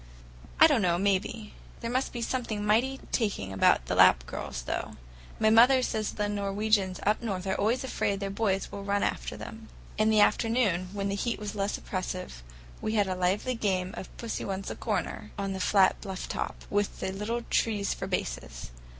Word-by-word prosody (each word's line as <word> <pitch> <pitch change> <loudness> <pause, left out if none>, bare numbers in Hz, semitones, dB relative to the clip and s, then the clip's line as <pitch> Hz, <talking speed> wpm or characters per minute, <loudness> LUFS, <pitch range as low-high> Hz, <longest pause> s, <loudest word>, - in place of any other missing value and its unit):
"I - - +10
don't 290 -8 +4
know, 175 -3 +2
maybe. 200 +3 -1 0.3
There 230 - -3
must 255 +2 0
be 240 -1 -4
something 225 -5 -2
mighty 250 +6 +2
taking 195 - -1
about 95 -9 +4
the - - -2
Lapp - - +6
girls, - - -5
though; - - -3 0.5
mother 235 +4 +6
says 215 -3 -1
the 210 -1 -1
Norwegians 200 -1 0
up 210 +1 +2
north 195 -5 -3
are 190 - 0
always 225 +7 +1
afraid 200 -6 -1
their 200 -1 -3
boys 195 -2 0
will 200 - -6
run 200 0 0
after - - -2
them." 220 -1 -9 0.3
In 215 0 +4
the 215 -1 +4
afternoon, 210 -4 +2
when 200 -1 -2
the - - -1
heat 230 +3 -1
was 210 -1 -5
less 200 0 -1
oppressive, 185 - -5 0.4
we 215 - -1
had 205 -2 +3
a 185 - -1
lively 185 +7 0
game 190 -5 -1
of - - -7
"Pussy 230 -1 -4
Wants 195 0 -4
a - - -5
Corner," - - -3
on 195 -1 -2
the 190 - -4
flat 190 +1 +3
bluff 190 -3 -5
top, - - -4
with 205 0 0
the 190 - -2
little 215 +5 -3
trees 210 -3 +1
for - - -5
bases. - - -4
205 Hz, 190 wpm, -29 LUFS, 190-225 Hz, 0.5 s, I